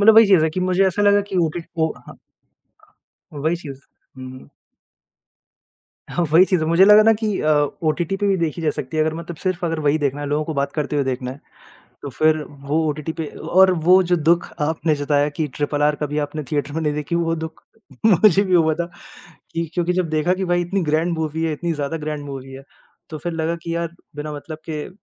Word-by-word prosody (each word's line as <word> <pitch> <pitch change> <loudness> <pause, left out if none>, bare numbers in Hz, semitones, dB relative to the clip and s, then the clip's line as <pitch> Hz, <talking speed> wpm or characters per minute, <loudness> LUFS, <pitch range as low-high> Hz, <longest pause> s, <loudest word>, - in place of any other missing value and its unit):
मतलब 215 +2 +7
वही 225 0 +8
चीज़ 190 -5 +5
है 160 - +1
कि 185 - -3
मुझे 185 +1 +2
ऐसा 190 +2 0
लगा 205 0 +5
कि 195 - -3
ओटी 160 +2 -4 0.2
वो 160 -1 +1
हाँ। - - -12 1.2
वही 155 +4 -1
चीज़, 140 -5 -9 0.4
हुँ, 130 0 -8
हुँ। 130 0 -12 1.6
हाँ 175 - 0
वही 165 +4 +7
चीज़ 185 -2 +1
है - - 0
मुझे 170 +3 +6
लगा 210 +1 +8
न - - +6
कि 215 -2 -2
अ, 155 - +1 0.3
ओटीटी 165 +4 0
पे 205 - -1
भी 195 -1 +2
देखी 165 -1 -2
जा 155 - +2
सकती 140 +1 -5
है 155 - +3
अगर 155 0 -1
मतलब 170 +1 -7
सिर्फ़ 185 +1 -2
अगर 165 -1 -2
वही 145 +2 +3
देखना 145 -1 -1
है 145 - -4
लोगों 150 +2 0
को 160 - -4
बात 140 0 -1
करते 150 -1 -2
हुए 140 - +1
देखना 130 -1 -3
है, 135 +3 -10 0.6
तो 140 - -6
फिर 155 +3 +2
वो 140 +2 -3
ओटीटी 150 +1 -3
पे 160 - -4
अ - - -12 0.2
और 190 0 +7 0.2
वो 185 +1 +7
जो - - +6
दुःख 170 +1 +2
आपने 155 +1 0
जताया 145 0 +1
कि 155 - 0
ट्रिपल 145 0 -1
आर 150 0 +3
कभी 150 0 -2
आपने 155 +1 -6
थिएटर 145 -1 -1
में 160 - -2
नहीं 150 -1 0
देखी 150 +3 -3
वो 165 -1 0
दुःख 160 0 -11 0.4
मुझे 200 -1 +5
भी 185 - -1
हुआ 160 -3 +4
था 170 - -2 0.7
कि 165 0 -1
क्योंकि 175 +1 0
जब 180 -2 -1
देखा 155 +3 +1
कि 190 +1 -3
भाई 175 0 +1
इतनी 185 +3 -1
ग्रैंड 160 +3 +1
मूवी 160 0 -2
है, 160 - 0
इतनी 170 +3 -2
ज़्यादा 150 +1 -3
ग्रैंड 150 -1 -5
मूवी 135 -1 -8
है, 135 +1 -10 0.5
तो 155 - -6
फिर 170 +3 -4
लगा 165 +1 -1
कि 165 0 -3
यार 170 0 -2 0.3
बिना 150 +1 -5
मतलब 155 +2 -8
के 150 +1 -4
160 Hz, 230 wpm, -21 LUFS, 150-175 Hz, 1.6 s, वही